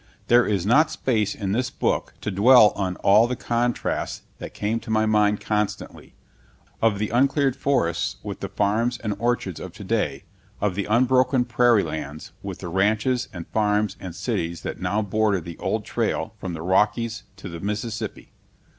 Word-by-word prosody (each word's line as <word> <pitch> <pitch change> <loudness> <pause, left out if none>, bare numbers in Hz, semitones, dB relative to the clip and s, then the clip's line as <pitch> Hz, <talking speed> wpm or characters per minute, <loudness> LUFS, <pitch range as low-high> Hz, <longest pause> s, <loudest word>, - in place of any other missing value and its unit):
There 120 0 +5
is 100 -4 0
not 150 +9 +4
space 110 -9 0
in 100 -3 -3
this 125 +4 0
book - - -1
to 105 - -3
dwell 110 +3 +7
on 95 -2 -2
all 105 +4 +6
the 125 - -2
contrasts 120 0 -2 0.2
that - - -7
came 110 +3 -1
to 110 - -12
my 110 0 +2
mind 105 -1 +2
constantly, 105 -1 -3 0.7
of 110 -3 +3
the 105 +1 -2
uncleared 135 +2 +2
forests 100 -9 0
with 100 -2 -6
the 100 - -5
farms 110 +5 0
and 105 -3 -3
orchards 115 -7 -1
of - - -8
today, - - -2 0.4
of 105 -2 0
the 100 +1 -2
unbroken 125 +2 +3
prairie 120 -2 +3
lands 75 -1 -6
with - - -7
the - - -5
ranches 110 +7 +1
and 85 -2 -7
farms 105 -2 +1
and 90 -3 -7
cities 85 0 -3
that - - -5
now 105 +1 0
border 105 -1 +1
the 85 -1 -9
old - - -2
trail - - -2
from 90 -2 -5
the 80 -1 -6
Rockies 110 +5 +1
to 95 - -9
the 85 -1 -7
Mississippi. 105 +3 -4
105 Hz, 170 wpm, -24 LUFS, 100-120 Hz, 0.7 s, dwell